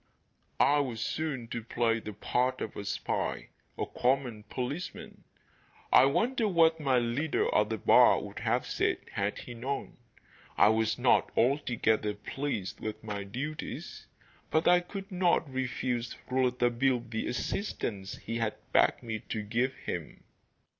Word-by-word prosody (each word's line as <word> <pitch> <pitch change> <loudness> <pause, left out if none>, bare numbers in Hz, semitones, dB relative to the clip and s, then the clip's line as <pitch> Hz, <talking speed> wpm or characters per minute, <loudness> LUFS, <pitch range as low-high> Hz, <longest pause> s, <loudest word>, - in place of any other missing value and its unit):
I 145 +1 +5
was 125 -6 -2
soon 135 -1 -2
to 120 -1 -4
play 115 0 +1
the 105 -1 -7
part 125 +5 0
of 110 - -5
a 100 - -6
spy - - -2 0.3
a - - -1
common 125 -3 0
policeman. 140 +8 -5 0.7
I 130 - +8
wonder 220 - +2
what 165 -3 +4
my 135 -4 +2
leader 120 +6 0
at 105 0 +3
the 110 - -1
bar - - +6
would - - -7
have - - 0
said - - 0
had 100 +1 -1
he 120 - -8
known! 130 +4 -4 0.6
I 105 - +7
was 110 -1 +1
not 125 0 +3
altogether 115 -5 +2
pleased 105 -3 -4
with 110 0 -5
my 105 -2 -4
duties, 135 +10 -6 0.4
but 160 +1 +2
I 175 0 +7
could 195 +3 -8
not 180 -3 +2
refuse 125 -2 -2
Rouletabille 125 0 +2
the 110 -1 -2
assistance 115 - -3
he 115 +1 -4
had 115 -2 -1 0.2
begged - - +3
me 110 -2 -3
to 110 -2 -2
give 120 +5 0
him. - - -6
125 Hz, 145 wpm, -30 LUFS, 110-140 Hz, 0.7 s, I